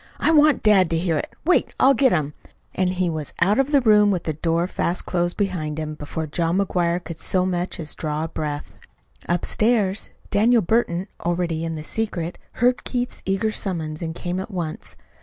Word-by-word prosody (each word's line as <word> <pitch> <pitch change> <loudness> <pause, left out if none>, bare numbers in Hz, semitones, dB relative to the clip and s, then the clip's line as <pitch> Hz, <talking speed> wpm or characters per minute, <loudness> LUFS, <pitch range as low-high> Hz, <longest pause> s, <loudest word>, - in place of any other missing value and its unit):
I - - +2
want 300 -3 +5
dad 195 -5 +5
to 165 - +1
hear 165 -2 0
it. - - -5
Wait, 355 - +2
I'll 270 +1 +6
get 260 0 +3
him." 150 -3 0 0.4
And 185 -1 +1
he 180 0 0
was 155 -3 -4
out 200 +8 +3
of 270 +2 +1
the 285 -2 +5
room 210 -3 +5
with 185 -4 0
the 155 - -2
door 165 +2 0
fast 180 -1 -2
closed 175 -1 -1
behind 175 -7 -2
him 155 -1 -3
before 155 +1 -5
John 165 +3 0
McGuire 175 -3 0
could 165 -2 -8
so 185 -1 +1
much 180 -1 -2
as 155 -2 -5
draw 155 0 -3
a - - -2
breath. 150 -2 -4 0.6
Upstairs, 200 +3 +1 0.2
Daniel 225 +2 +4
Burton, 185 -2 +1 0.2
already 170 -1 -1
in 165 -1 -3
the 155 - -6
secret, 175 -3 -3
heard 245 +1 +2
Keith's 245 -1 -3
eager 195 +3 +1
summons 160 -7 -4
and 160 -1 -4
came 180 +1 -3
at 190 - -5
once. 175 -6 -5
180 Hz, 195 wpm, -23 LUFS, 165-210 Hz, 0.6 s, I'll